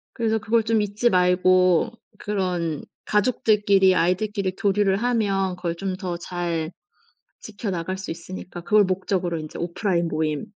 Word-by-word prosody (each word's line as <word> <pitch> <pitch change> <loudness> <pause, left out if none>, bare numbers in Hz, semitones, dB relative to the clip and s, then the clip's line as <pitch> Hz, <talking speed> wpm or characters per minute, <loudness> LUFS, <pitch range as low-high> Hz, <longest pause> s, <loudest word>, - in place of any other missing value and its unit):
그래서 225 -2 +1
그걸 220 +1 +1
좀 220 -1 +2
잊지 210 +4 +1
말고 180 +2 +3 0.3
그런 180 -6 -2 0.2
가족들끼리, 205 -3 +3
아이들끼리 190 +2 0
교류를 200 -1 +2
하면 200 -5 0
그걸 170 -2 -3
좀 190 +1 -3
더 180 -3 -4
잘 170 -2 -3 0.7
지켜나갈 190 -4 -4
수 190 - -6
있으니까 175 +1 -8
그걸 210 +4 +4
목적으로 185 -2 -1
인제 155 -1 -8
오프라인 170 0 -1
모임에 155 -2 -1
185 Hz, 320 characters per minute, -23 LUFS, 175-210 Hz, 0.7 s, 그걸